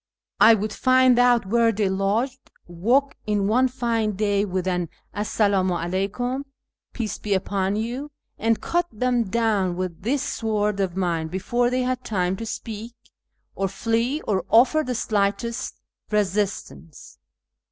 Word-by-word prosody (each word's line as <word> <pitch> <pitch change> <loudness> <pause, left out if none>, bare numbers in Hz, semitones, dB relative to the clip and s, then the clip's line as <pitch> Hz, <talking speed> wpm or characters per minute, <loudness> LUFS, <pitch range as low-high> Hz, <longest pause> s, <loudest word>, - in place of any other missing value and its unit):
I 225 - +8
would 215 +1 -3
find 255 -1 +4
out 245 -3 +4
where 230 +3 +3
they 210 -2 0
lodged, 210 +8 -1 0.2
walk 240 +12 +1
in 205 -2 +1
one 250 +5 +3
fine 230 -4 -1
day 205 0 +1
with 185 -1 -2
an 180 -3 -1
' - - -41
esse! 205 +1 -4
dm 200 -3 +3
u 180 - +1
'aleyJcam' 195 +10 -2 0.5
('peace 225 -4 -4
be 205 -2 0
upon 195 +1 -1
you'), 240 +7 -3 0.3
and 225 0 +1
cut 345 0 0
them 245 +1 0
down 205 -4 +1
with 180 -2 -4
this 255 +7 0
sword 210 -2 -1
of 190 -2 -1
mine 170 -4 0
before 240 +8 0
they 255 0 0
had 255 0 -2
time 185 -3 -1
to 225 - -6
speak, 225 +1 -6 0.6
or 195 - -1
fiee, 230 - -1
or 190 -4 +1
offer 250 +7 +5
the 255 - -2
sliglitest 215 +1 -1 0.4
resistance." 195 - -3
215 Hz, 150 wpm, -24 LUFS, 190-240 Hz, 0.6 s, I